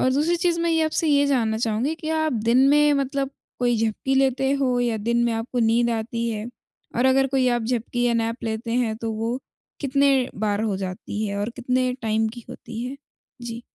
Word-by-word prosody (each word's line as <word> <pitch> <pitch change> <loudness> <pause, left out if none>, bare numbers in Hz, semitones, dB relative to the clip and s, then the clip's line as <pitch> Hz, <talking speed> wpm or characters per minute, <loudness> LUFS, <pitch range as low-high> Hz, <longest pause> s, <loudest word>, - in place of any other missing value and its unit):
और 255 - +3
दूसरी 315 +5 +2
चीज़ 335 0 +1
मैं 335 0 +1
ये 325 0 +2
आपसे 315 +1 0
ये 285 -1 +4
जानना 230 -6 +1
चाहूँगी 230 +6 0
कि 320 -1 -7
आप 315 -1 +1
दिन 235 +2 +4
में 295 0 +5
मतलब 275 0 -1 0.3
कोई 245 -1 +2
झपकी 265 +5 -1
लेते 270 0 +2
हो 255 -2 +2
या 235 -2 0
दिन 235 +3 0
में 235 - +1
आपको 230 +2 -3
नींद 235 +1 +3
आती 230 +1 -2
है? 215 0 -3 0.5
और 250 +2 +3
अगर 270 +1 +4
कोई 265 -1 +2
आप 240 -1 +1
झपकी 240 +1 -2
या 235 - +2
नैप 230 +1 -1
लेते 225 +1 -3
हैं, 230 -3 0
तो 225 -1 -3
वो 230 +3 -2 0.4
कितने 275 -2 +2
बार 205 0 -1
हो 210 -3 0
जाती 190 +3 -4
है 200 0 -3
और 205 +3 -2
कितने 255 0 0
टाइम 220 0 +1
की 235 +1 -10
होती 230 0 -7
है? 265 +2 -5 0.5
जी। 235 0 -6
240 Hz, 210 wpm, -23 LUFS, 225-270 Hz, 0.5 s, में